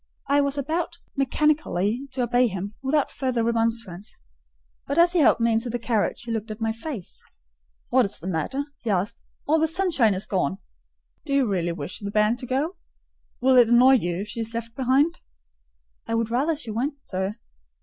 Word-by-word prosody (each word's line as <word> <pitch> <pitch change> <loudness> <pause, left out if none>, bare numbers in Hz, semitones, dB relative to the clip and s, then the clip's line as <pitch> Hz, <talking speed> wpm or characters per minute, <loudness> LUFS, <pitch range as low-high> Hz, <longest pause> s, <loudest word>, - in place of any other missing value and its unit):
I 285 +1 +4
was 280 0 -1
about 315 +5 -2 0.2
mechanically 275 - +1
to 255 - 0
obey 245 +1 +3
him, 195 0 -5
without 275 +2 +1
further 255 -4 -1
remonstrance; 230 -5 -1 0.7
but 280 - -2
as 345 +1 +5
he 355 - +3
helped 290 - +5
me 230 0 +2
into 225 +2 0
the 240 - -1
carriage, 230 -2 -1
he 235 - -5
looked 225 0 -3
at 215 +1 -6
my 225 -1 0
face. 230 - -7 0.7
"What 255 -1 +4
is 200 - -4
the 165 - -11
matter?" 190 - -1 0.2
he 235 - -5
asked; 200 +2 -1 0.3
"all 315 +2 +4
the 320 - +3
sunshine 320 - +2
is 190 - -2
gone. 185 -2 -1 0.7
Do 280 - -3
you 270 -3 +3
really 175 -4 0
wish 180 +1 -6
the 200 - -5
bairn 210 +2 +3
to 250 - -7
go? 285 +9 -1 0.6
Will 260 0 +5
it 240 -2 +7
annoy 250 +3 +7
you 175 -3 -2
if 210 - -6
she 230 - -6
is 225 0 -4
left 230 0 -4
behind?" 270 +6 +2 0.9
"I 230 - -1
would 230 -1 0
far 240 +2 +1
rather 325 - +2
she 240 -7 -7
went, 275 +6 -2
sir." 190 +2 -3
235 Hz, 195 wpm, -25 LUFS, 210-275 Hz, 0.9 s, it